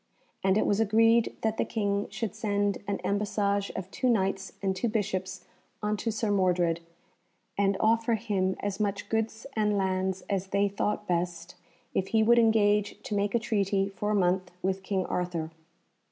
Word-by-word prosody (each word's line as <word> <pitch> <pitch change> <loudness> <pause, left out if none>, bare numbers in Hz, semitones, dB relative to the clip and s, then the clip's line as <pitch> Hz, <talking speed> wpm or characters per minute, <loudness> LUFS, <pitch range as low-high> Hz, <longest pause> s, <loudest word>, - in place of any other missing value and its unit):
And 190 +1 +3
it - - +2
was 205 - +2
agreed 225 +2 +4
that 220 0 0
the - - +2
King 200 -2 -1
should 225 -5 -4
send 205 -1 0
an 200 -1 0
embassage 200 0 0
of 190 0 -5
two 255 - 0
Knights 195 -3 0
and 190 -1 -1
two 230 +5 -1
Bishops 190 -3 -2 0.4
unto 210 +2 -1
Sir 220 -1 -1
Mordred, 180 -4 +2 0.8
and 200 -1 +2
offer 225 +1 +3
him 195 -4 0
as 200 0 -3
much 205 -1 -2
goods 225 +1 -1
and 210 -2 +2
lands 190 -1 -1
as 195 -2 -1
they 200 +1 +2
thought 210 +1 -2
best 175 0 -2 0.4
if 190 - 0
he 220 -1 +3
would 235 +2 +5
engage 210 -2 +3
to - - -5
make 205 +2 0
a - - +4
treaty 200 -3 0
for 205 +1 -3
a 210 - +2
month 185 -1 +1
with 190 +1 0
King 190 -1 -1
Arthur. 170 -3 -2
200 Hz, 170 wpm, -28 LUFS, 190-215 Hz, 0.8 s, would